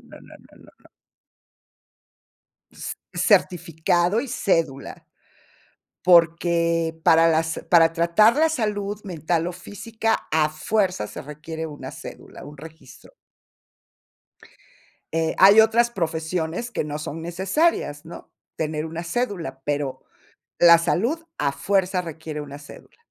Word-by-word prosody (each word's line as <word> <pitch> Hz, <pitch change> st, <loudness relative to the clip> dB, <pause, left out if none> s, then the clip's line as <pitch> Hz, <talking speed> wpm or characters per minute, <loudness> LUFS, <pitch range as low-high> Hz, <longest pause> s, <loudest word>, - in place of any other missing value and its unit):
no, -, -, -15 dB
no, -, -, -18 dB
no, -, -, -18 dB
no. -, -, -22 dB, 1.8 s
S -, -, -7 dB, 0.2 s
certificado 175 Hz, +3 st, +1 dB
y 275 Hz, -, -6 dB
cédula. 165 Hz, -, -2 dB, 1.0 s
Porque 170 Hz, -1 st, +3 dB
para 165 Hz, 0 st, +5 dB
las 160 Hz, 0 st, 0 dB
para 165 Hz, -2 st, +6 dB
tratar 170 Hz, +8 st, +4 dB
la 320 Hz, +1 st, +3 dB
salud 210 Hz, -6 st, -3 dB
mental 170 Hz, -2 st, -2 dB
o -, -, -3 dB
física 220 Hz, +4 st, -3 dB
a 155 Hz, -1 st, +2 dB
fuerza 180 Hz, -, -1 dB
se -, -, -8 dB
requiere 155 Hz, +3 st, -7 dB
una 150 Hz, -2 st, -8 dB
cédula, -, -, -11 dB
un 145 Hz, +1 st, -12 dB
registro. 160 Hz, -, -14 dB, 2.0 s
Eh, 160 Hz, 0 st, 0 dB
hay 200 Hz, +4 st, +8 dB
otras 230 Hz, +2 st, +3 dB
profesiones 165 Hz, +2 st, -3 dB
que -, -, -2 dB
no 150 Hz, 0 st, -5 dB
son 155 Hz, +1 st, -6 dB
necesarias, 175 Hz, -, -1 dB
¿no?, 165 Hz, -, -11 dB, 0.3 s
tener 155 Hz, 0 st, -2 dB
una 165 Hz, +1 st, -6 dB
cédula, 170 Hz, -, -3 dB
pero 145 Hz, -2 st, -3 dB, 0.6 s
la 170 Hz, -1 st, +8 dB
salud 235 Hz, -, 0 dB, 0.2 s
a 140 Hz, -1 st, 0 dB
fuerza 190 Hz, +1 st, 0 dB
requiere 160 Hz, -2 st, -7 dB
una 145 Hz, 0 st, -9 dB
cédula. 145 Hz, -, -15 dB
170 Hz, 120 wpm, -23 LUFS, 160-200 Hz, 2.0 s, hay